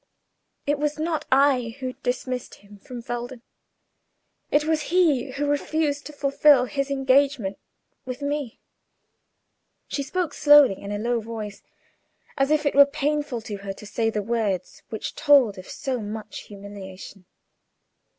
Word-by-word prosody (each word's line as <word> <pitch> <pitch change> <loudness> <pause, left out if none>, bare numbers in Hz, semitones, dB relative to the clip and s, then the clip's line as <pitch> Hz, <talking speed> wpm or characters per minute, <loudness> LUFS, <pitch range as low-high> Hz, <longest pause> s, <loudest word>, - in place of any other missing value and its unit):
It 290 0 0
was 300 0 -1
not 315 0 -2
I 260 -4 +3
who 255 -1 -4
dismissed 250 0 -3
him 205 0 -17
from 240 +3 -9
Felden; 240 +1 -5 1.1
it 295 - +3
was 315 -1 +1
he 315 -8 +3
who 285 +2 -1
refused 290 0 0
to - - -9
fulfil 280 -2 +4
his 275 +1 -2
engagement 270 -6 +2 0.4
with 255 0 -6
me." 285 -4 -3 1.3
She 285 - -3
spoke 320 +2 -2
slowly, 290 -8 +6
in 200 - -6
a 205 - -2
low 235 +2 0
voice, 215 -2 -7 0.7
as 275 0 +1
if 305 0 +2
it 285 - +2
were 280 0 +8
painful 290 -3 -1
to 215 -2 -6
her 195 0 -6
to 210 - -12
say 225 +2 0
the 210 -2 -2
words 205 -5 -2
which 220 - -5
told 275 -10 +4
of 185 - -11
so 260 -2 -3
much 210 0 -7
humiliation. 195 -2 -10
255 Hz, 145 wpm, -24 LUFS, 215-290 Hz, 1.3 s, were